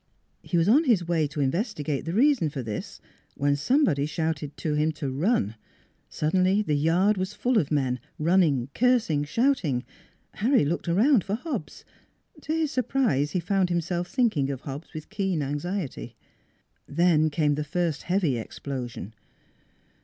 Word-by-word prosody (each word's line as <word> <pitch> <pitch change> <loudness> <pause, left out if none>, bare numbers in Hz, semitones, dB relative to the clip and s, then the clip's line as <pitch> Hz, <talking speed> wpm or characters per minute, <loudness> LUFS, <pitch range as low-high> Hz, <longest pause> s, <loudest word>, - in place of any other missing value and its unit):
He 175 - -2
was 165 +1 +3
on 285 +10 +5
his 200 - +2
way 165 -3 +1
to 145 +1 -4
investigate 150 - -1
the 165 - -3
reason 245 - +3
for 140 -3 -5
this 110 -2 -6 0.4
when 145 0 +1
somebody 145 - +2
shouted 155 -2 -3
to 155 - -2
him 150 +1 +1
to 145 -3 -4
run.... 140 - +1 0.6
Suddenly 185 +6 +1
the 155 - -1
yard 170 +8 +2
was 190 +2 -3
full 245 +1 +2
of 150 - -1
men, 130 -4 0 0.2
running, 155 -6 +2
cursing, 230 - +2
shouting. 165 - +1 0.5
Harry 245 - +2
looked 170 +4 -2
around 210 - +4
for 195 +1 -2
Hobbs: 235 - -6 0.6
to 305 - -5
his 320 -2 0
surprise 245 - 0
he 185 - +1
found 185 +1 +1
him 175 -1 +1
self 175 +1 -3
thinking 180 - +1
of 135 -2 -4
Hobbs 140 +3 -7
with 155 +4 -8
keen 190 -7 -1
anxiety. 145 +3 -4 0.7
Then 155 0 +3
came 150 -1 +1
the 150 +1 -2
first 165 0 -1
heavy 175 -9 0
explosion. 120 -4 -6
165 Hz, 155 wpm, -26 LUFS, 145-205 Hz, 0.7 s, on